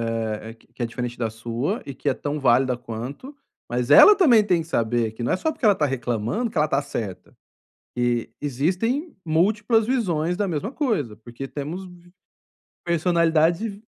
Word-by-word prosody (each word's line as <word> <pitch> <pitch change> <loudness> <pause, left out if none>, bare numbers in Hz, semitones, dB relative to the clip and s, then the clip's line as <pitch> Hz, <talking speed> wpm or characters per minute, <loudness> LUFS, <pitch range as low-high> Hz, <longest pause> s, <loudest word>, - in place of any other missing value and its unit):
eh, 110 0 -4
q 115 - -26
que 120 - -4
é - - +1
diferente 120 +1 -5
da 115 -2 -1
sua, 120 - -3
e 140 - -6
que 145 - -8
é - - +2
tão 145 +3 -4
válida 130 -1 +3
quanto, 125 - -7 0.3
mas 120 +1 -1
ela 420 - +9
também 245 - +5
tem 180 -4 +2
que 160 - -9
saber 115 -5 0
que 110 +2 -7
não 120 - 0
é - - +2
só 315 - -1
porque 260 - -5
ela 205 - +6
tá 155 - +1
reclamando 125 - -2
que - - -6
ela 150 0 +3
tá 140 -1 +1
certa. 105 -9 -6 0.6
E 120 -1 0
existem 185 - -1
múltiplas 210 +7 +2
visões 180 -9 0
da 205 - 0
mesma 180 - -3
coisa, 210 - -1
porque 120 +4 -8
temos 155 +8 -6
vi 175 -1 -16 0.7
personalidades 170 -1 +2
e 205 - -18
150 Hz, 185 wpm, -23 LUFS, 120-190 Hz, 0.7 s, ela